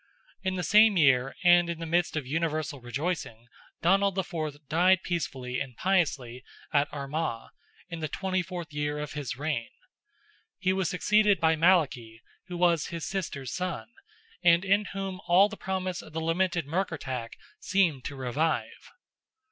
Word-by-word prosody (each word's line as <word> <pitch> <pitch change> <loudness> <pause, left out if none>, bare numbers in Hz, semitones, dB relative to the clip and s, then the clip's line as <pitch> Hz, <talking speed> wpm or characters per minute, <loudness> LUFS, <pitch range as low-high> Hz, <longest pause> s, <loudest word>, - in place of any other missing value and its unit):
In 190 -1 -1
the 180 - -2
same 210 +3 +6
year, 135 -4 +3
and 175 -1 +6
in 170 - -3
the 165 - -5
midst 170 +1 +1
of 155 -4 -2
universal 155 -1 -2
rejoicing, 120 -2 -4 0.4
Donald 195 +2 +3
IV. 155 -6 -4
died 180 +5 +3
peacefully 130 -7 -3
and 125 -3 -6
piously 140 -10 0 0.3
at 145 0 +2
Armagh, 140 -3 -4 0.4
in 170 -2 -6
the 155 -1 -3
24th 185 -3 -3
year 145 0 -2
of 150 0 -5
his 140 -5 -4
reign. 145 -5 -2 0.9
He 185 0 +1
was 190 -3 0
succeeded 210 +1 +3
by 160 -1 +3
Malachy, 145 -10 +2 0.2
who 180 -2 -5
was 170 -4 +2
his 165 -4 -5
sister's 145 -8 -4
son, 185 0 -4 0.5
and 170 +2 +5
in 200 +2 +3
whom 195 -2 -5
all 190 +4 +6
the 215 - -7
promise 185 -2 -3
of 155 - -14
the 160 - -2
lamented 170 0 0
Murkertach 145 -8 -3 0.3
seemed 170 -9 +1
to 140 - -5
revive. 140 +5 -2
165 Hz, 150 wpm, -28 LUFS, 145-185 Hz, 0.9 s, same